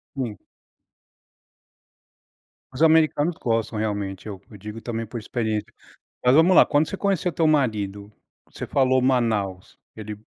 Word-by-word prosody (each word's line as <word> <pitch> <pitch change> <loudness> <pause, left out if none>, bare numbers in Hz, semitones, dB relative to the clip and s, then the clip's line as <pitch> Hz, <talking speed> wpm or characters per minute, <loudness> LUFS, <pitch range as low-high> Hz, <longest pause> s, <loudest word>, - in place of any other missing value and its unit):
Sim. 120 -6 -4 2.3
Os 130 +4 -1
americanos 160 0 +3
gostam 115 -2 -1
realmente, 100 -2 -3
eu 100 -3 -7
eu - - -13
digo 105 +3 -8
também 115 0 -4
por 115 +2 -6
experiência, 110 -2 -3 0.5
mas 125 +1 +5
vamos 165 +4 +5
lá: - - +8
quando 145 +2 +2
você - - -4
conheceu 195 -3 0
teu 165 - +1
marido, 105 -9 0 0.4
você - - -7
falou 130 -1 +2
Manaus, 110 -8 -1 0.2
ele 105 -1 -7
115 Hz, 135 wpm, -23 LUFS, 105-145 Hz, 2.3 s, lá